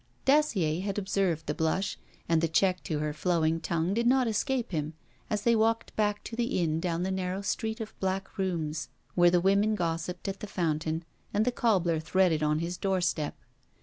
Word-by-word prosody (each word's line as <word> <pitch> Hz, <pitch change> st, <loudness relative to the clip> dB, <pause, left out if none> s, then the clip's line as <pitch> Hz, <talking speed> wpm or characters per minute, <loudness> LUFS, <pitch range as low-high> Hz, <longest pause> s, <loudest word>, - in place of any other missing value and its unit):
Dacier 205 Hz, -, +3 dB
had 200 Hz, 0 st, -3 dB
observed 190 Hz, -5 st, 0 dB
the 150 Hz, -, -1 dB
blush, 175 Hz, +6 st, -1 dB, 0.3 s
and 165 Hz, -1 st, +3 dB
the 165 Hz, -, +2 dB
check 185 Hz, +3 st, +2 dB
to 155 Hz, -, -1 dB
her 150 Hz, 0 st, -1 dB
flowing 165 Hz, 0 st, +1 dB
tongue 170 Hz, +2 st, -1 dB
did 235 Hz, +2 st, +1 dB
not 255 Hz, 0 st, +4 dB
escape 240 Hz, +2 st, -1 dB
him 155 Hz, -2 st, -2 dB, 0.3 s
as 210 Hz, -3 st, -1 dB
they 235 Hz, -1 st, +4 dB
walked 225 Hz, +1 st, +1 dB
back 210 Hz, -1 st, 0 dB
to 225 Hz, -, -6 dB
the 235 Hz, -4 st, 0 dB
inn 160 Hz, -2 st, +1 dB
down 170 Hz, 0 st, -1 dB
the 190 Hz, -, -1 dB
narrow 190 Hz, +1 st, -2 dB
street 220 Hz, +2 st, -2 dB
of 220 Hz, -1 st, -6 dB
black 190 Hz, +1 st, -3 dB
rooms, 155 Hz, -7 st, -2 dB, 0.2 s
where 175 Hz, -1 st, +6 dB
the 175 Hz, 0 st, +4 dB
women 200 Hz, +4 st, +3 dB
gossiped 170 Hz, 0 st, -3 dB
at 195 Hz, 0 st, -3 dB
the 210 Hz, -, -6 dB
fountain 160 Hz, -2 st, -1 dB, 0.3 s
and 210 Hz, +2 st, +3 dB
the 250 Hz, -, +2 dB
cobbler 185 Hz, -9 st, +2 dB
threaded 165 Hz, 0 st, +2 dB
on 150 Hz, 0 st, +2 dB
his 170 Hz, +2 st, -3 dB
doorstep. 175 Hz, -6 st, 0 dB
185 Hz, 190 wpm, -29 LUFS, 165-210 Hz, 0.3 s, where